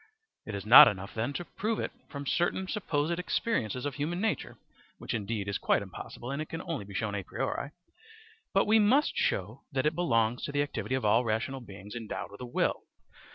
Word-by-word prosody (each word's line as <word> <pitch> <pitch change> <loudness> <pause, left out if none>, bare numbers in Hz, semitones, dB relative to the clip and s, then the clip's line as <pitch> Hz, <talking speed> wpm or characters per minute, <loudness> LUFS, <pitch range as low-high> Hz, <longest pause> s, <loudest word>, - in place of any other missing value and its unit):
It 110 - -4
is 100 - -5
not 135 +7 +11
enough, 100 -1 -2
then, 115 +5 -1
to 175 +5 -4
prove 215 +5 -2
it - - -2 0.2
from 140 -1 -6
certain 175 +5 0
supposed 170 -5 -1
experiences 130 - -1
of 145 - -2
human 150 +6 -2
nature 220 +1 -2 0.4
(which - - -5
indeed 105 -2 -2
is 100 - -1
quite - - +2
impossible, 120 +2 -8
and 140 +2 -2
it 155 - -6
can 165 - -5
only 160 - -4
be 100 -1 -10
shown 105 +2 -1
a 100 - -2
priori), 115 - -3 0.8
but 195 - +3
we 220 +1 +5
must 250 +8 +3
show 105 +8 -1
that 135 -1 0
it 150 - +3
belongs 120 -9 +1
to - - -4
the 145 0 +2
activity 135 -2 -3
of 130 - -2
all 110 +4 +4
rational 115 +4 -1
beings 100 -2 -10
endowed 115 -4 -5
with 100 - -11
a 125 - -5
will. 120 - 0
130 Hz, 205 wpm, -30 LUFS, 110-165 Hz, 0.8 s, not